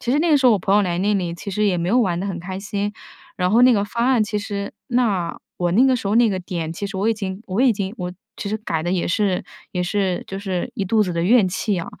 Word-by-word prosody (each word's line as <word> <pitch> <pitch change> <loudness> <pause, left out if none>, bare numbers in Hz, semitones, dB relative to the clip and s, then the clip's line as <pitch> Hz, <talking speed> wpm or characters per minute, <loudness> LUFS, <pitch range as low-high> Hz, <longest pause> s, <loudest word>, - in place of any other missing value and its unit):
其 240 - -1
实 285 - +3
那 335 +2 +2
个 300 - +6
时 270 - -2
候 245 - +7
我 210 - +2
朋 195 +2 +1
友 210 - +5
来 175 -2 -1
那 205 +2 +1
里 180 -3 -1
其 200 - -7
实 210 +2 0
也 185 -4 +2
没 170 - -1
有 240 +6 +3
玩 180 -7 +1
得 195 - -3
很 190 -3 -3
开 185 +2 -5
心。 205 +1 -3 0.4
然 180 0 +1
后 230 +4 +5
那 250 0 +7
个 205 -3 +2
方 235 +3 -1
案 255 -4 +4
其 210 0 -2
实 200 -1 -4 0.2
那 215 -9 0 0.2
我 175 -1 0
那 240 +8 +5
个 260 -1 +3
时 225 - -5
候 205 - +1
那 235 -1 +5
个 190 - -1
点， 170 -3 -4
其 200 +4 -4
实 195 0 -6
我 200 +3 +1
已 225 - +2
经 195 -1 -5
我 190 +4 -1
已 260 -3 +5
经 200 -1 -4
我 180 0 -4 0.2
其 200 - -4
实 215 - -1
改 165 -7 -2
得 175 +2 -1
也 180 - 0
是 195 0 0 0.3
也 180 - -1
是 185 0 -1
就 195 - -5
是 195 +2 -3
一 200 -6 -2
肚 215 +3 +3
子 185 -3 -2
的 170 0 -1
怨 215 +3 +5
气 195 +1 -1
啊。 165 - -4
200 Hz, 325 characters per minute, -21 LUFS, 180-220 Hz, 0.4 s, 候